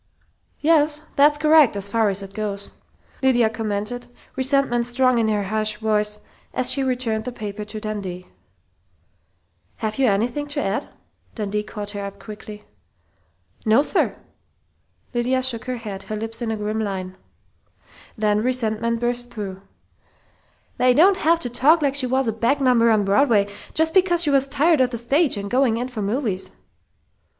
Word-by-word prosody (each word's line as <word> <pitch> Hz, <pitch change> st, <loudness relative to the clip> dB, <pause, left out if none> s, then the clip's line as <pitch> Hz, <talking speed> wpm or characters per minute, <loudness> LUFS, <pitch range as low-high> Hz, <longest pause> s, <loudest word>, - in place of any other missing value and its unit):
"Yes, 300 Hz, -1 st, +2 dB
that's 295 Hz, +1 st, +5 dB
correct, 305 Hz, -5 st, +5 dB
as 200 Hz, 0 st, -1 dB
far 220 Hz, +1 st, +1 dB
as 200 Hz, 0 st, -3 dB
it 195 Hz, 0 st, -10 dB
goes," 200 Hz, -1 st, -4 dB, 0.5 s
Lydia 240 Hz, -4 st, +3 dB
commented, 225 Hz, +2 st, -3 dB, 0.3 s
resentment 260 Hz, -3 st, +2 dB
strong 255 Hz, 0 st, +2 dB
in 225 Hz, -, +1 dB
her 210 Hz, -1 st, 0 dB
harsh 215 Hz, +1 st, -1 dB
voice 210 Hz, -1 st, 0 dB, 0.3 s
as 255 Hz, -, +2 dB
she 275 Hz, -, +2 dB
returned 245 Hz, -4 st, -1 dB
the 250 Hz, -, -5 dB
paper 210 Hz, -3 st, -6 dB
to 215 Hz, +1 st, -7 dB
Dundee. 200 Hz, -4 st, -5 dB, 1.5 s
"Have 215 Hz, +3 st, -4 dB
you 265 Hz, -, +4 dB
anything 240 Hz, +8 st, 0 dB
to 290 Hz, 0 st, -2 dB
add?" 200 Hz, -6 st, -2 dB, 0.5 s
Dundee 210 Hz, -1 st, -2 dB
caught 210 Hz, -1 st, -6 dB
her 205 Hz, -1 st, -5 dB
up 200 Hz, 0 st, -7 dB
quickly. 210 Hz, +1 st, -10 dB, 1.0 s
"No, 225 Hz, +5 st, +4 dB
sir!" -, -, 0 dB, 1.0 s
Lydia 250 Hz, +2 st, 0 dB
shook 245 Hz, -3 st, 0 dB
her 255 Hz, -1 st, -3 dB
head, 205 Hz, -4 st, -7 dB
her 215 Hz, -, -2 dB
lips 225 Hz, +2 st, -4 dB
in 235 Hz, -, -2 dB
a 220 Hz, -, -2 dB
grim 210 Hz, +1 st, -3 dB
line. 190 Hz, -3 st, -4 dB, 1.0 s
Then 210 Hz, -1 st, +1 dB
resentment 230 Hz, -2 st, -1 dB
burst 245 Hz, 0 st, -1 dB
through: 195 Hz, -5 st, -7 dB, 1.2 s
"They 250 Hz, 0 st, +4 dB
don't 375 Hz, +6 st, +5 dB
have 330 Hz, 0 st, +2 dB
to 245 Hz, -, -4 dB
talk 300 Hz, +6 st, +4 dB
like 280 Hz, -2 st, +2 dB
she 280 Hz, -2 st, +1 dB
was 260 Hz, 0 st, 0 dB
a 225 Hz, -, 0 dB
back 235 Hz, +6 st, +1 dB
number 245 Hz, -4 st, +4 dB
on 215 Hz, -2 st, +3 dB
Broadway, 205 Hz, 0 st, +3 dB, 0.3 s
just 320 Hz, 0 st, +2 dB
because 360 Hz, -2 st, +4 dB
she 295 Hz, -, +2 dB
was 275 Hz, -1 st, +3 dB
tired 295 Hz, +2 st, +3 dB
of 255 Hz, -, +3 dB
the 240 Hz, -, -4 dB
stage 270 Hz, +4 st, +2 dB
and 200 Hz, 0 st, -4 dB
going 245 Hz, 0 st, +2 dB
in 245 Hz, +2 st, -3 dB
for 235 Hz, -4 st, -5 dB
movies!" 205 Hz, -2 st, -2 dB
230 Hz, 165 wpm, -22 LUFS, 210-265 Hz, 1.5 s, that's